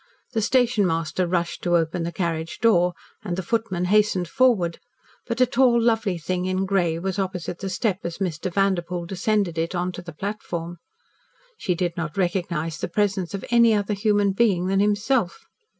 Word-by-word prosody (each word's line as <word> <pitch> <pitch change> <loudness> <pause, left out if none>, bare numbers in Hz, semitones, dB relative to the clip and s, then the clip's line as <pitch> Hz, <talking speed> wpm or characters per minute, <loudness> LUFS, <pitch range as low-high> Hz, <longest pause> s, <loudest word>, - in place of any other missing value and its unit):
The 225 -3 0
stationmaster 185 - +1
rushed 170 -1 -1
to 175 -1 +3
open 165 +1 -1
the 170 +1 -2
carriage 165 -2 -3
door, 180 -6 +3 0.3
and 180 -5 -3
the 190 - -3
footman 190 -3 -1
hastened 200 -2 +2
forward, 200 - +2 0.5
but 235 0 -3
a 255 - +6
tall 245 -1 +3
lovely 225 -5 +1
thing 180 +2 -2
in 185 +1 0
grey 180 -4 +1
was 190 +3 -3
opposite 180 -3 -3
the 195 - -4
step 195 0 -1
as 170 -1 -4
Mr. 180 -2 -3
Vanderpoel 180 -2 0
descended 190 -1 0
it 165 +2 -1
to 180 0 -2
the 170 - -8
platform. 175 -2 -5 0.8
She 180 - -1
did 175 -1 -1
not 160 -1 -4
recognise 170 -3 -1
the - - -2
presence 195 0 -1
of 195 - -6
any 235 -2 +5
other 205 0 0
human 205 -1 +2
being 195 -4 +2
than 195 +1 +1
himself. 205 0 +1
185 Hz, 170 wpm, -24 LUFS, 175-210 Hz, 0.8 s, a